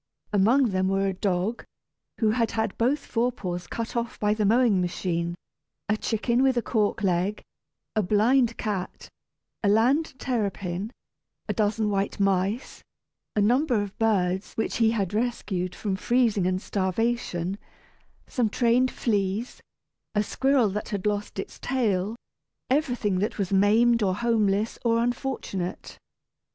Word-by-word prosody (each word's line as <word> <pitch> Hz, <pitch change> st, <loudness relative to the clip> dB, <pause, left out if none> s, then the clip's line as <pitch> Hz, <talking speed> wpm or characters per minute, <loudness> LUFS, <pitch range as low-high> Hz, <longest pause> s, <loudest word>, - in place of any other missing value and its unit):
Among 230 Hz, +6 st, +4 dB
them 185 Hz, 0 st, +1 dB
were 195 Hz, +1 st, +1 dB
a 195 Hz, -, 0 dB
dog, 190 Hz, +4 st, -1 dB, 0.5 s
who 220 Hz, -2 st, +2 dB
had 230 Hz, 0 st, +1 dB
had 220 Hz, -3 st, 0 dB
both 270 Hz, +5 st, +1 dB
fore 240 Hz, +2 st, 0 dB
paws 180 Hz, -6 st, -5 dB
cut 230 Hz, 0 st, -5 dB
off 235 Hz, 0 st, -3 dB
by 210 Hz, 0 st, +2 dB
the 210 Hz, -1 st, +1 dB
mowing 225 Hz, -4 st, +4 dB
machine, 170 Hz, -1 st, -2 dB, 0.5 s
a 210 Hz, -, +2 dB
chicken 235 Hz, +3 st, 0 dB
with 265 Hz, -2 st, +3 dB
a 240 Hz, -, +1 dB
cork 210 Hz, -2 st, 0 dB
leg, 190 Hz, +2 st, 0 dB, 0.5 s
a 215 Hz, -, +3 dB
blind 230 Hz, +5 st, +3 dB
cat, 200 Hz, -4 st, -4 dB, 0.5 s
a 200 Hz, -, +3 dB
land 260 Hz, +8 st, +2 dB
terrapin, 200 Hz, -6 st, -2 dB, 0.6 s
a -, -, 0 dB
dozen 215 Hz, -1 st, +1 dB
white 200 Hz, 0 st, -1 dB
mice, 195 Hz, +4 st, 0 dB, 0.5 s
a 210 Hz, -, +3 dB
number 245 Hz, +3 st, +3 dB
of 205 Hz, -1 st, -4 dB
birds 190 Hz, -4 st, +1 dB
which 225 Hz, -, -2 dB
he 225 Hz, -2 st, +4 dB
had 205 Hz, -4 st, -1 dB
rescued 210 Hz, -6 st, -2 dB
from 200 Hz, -3 st, -2 dB
freezing 225 Hz, -3 st, +2 dB
and 185 Hz, +1 st, -1 dB
starvation, 195 Hz, -2 st, -1 dB, 0.7 s
some 240 Hz, -5 st, 0 dB
trained 245 Hz, +3 st, +3 dB
fleas, 205 Hz, 0 st, -1 dB, 0.5 s
a 210 Hz, -, +3 dB
squirrel 265 Hz, 0 st, +2 dB
that 205 Hz, +2 st, -4 dB
had 200 Hz, -2 st, -3 dB
lost 205 Hz, -1 st, -2 dB
its 195 Hz, -, -6 dB
tail 220 Hz, -5 st, 0 dB, 0.6 s
everything 245 Hz, -9 st, +1 dB
that 210 Hz, -, -1 dB
was 200 Hz, -2 st, -2 dB
maimed, 225 Hz, +4 st, +4 dB
or 190 Hz, -3 st, +1 dB
homeless, 215 Hz, -2 st, +1 dB
or 230 Hz, -1 st, +3 dB
unfortunate. 235 Hz, -6 st, -3 dB
210 Hz, 140 wpm, -26 LUFS, 195-235 Hz, 0.7 s, Among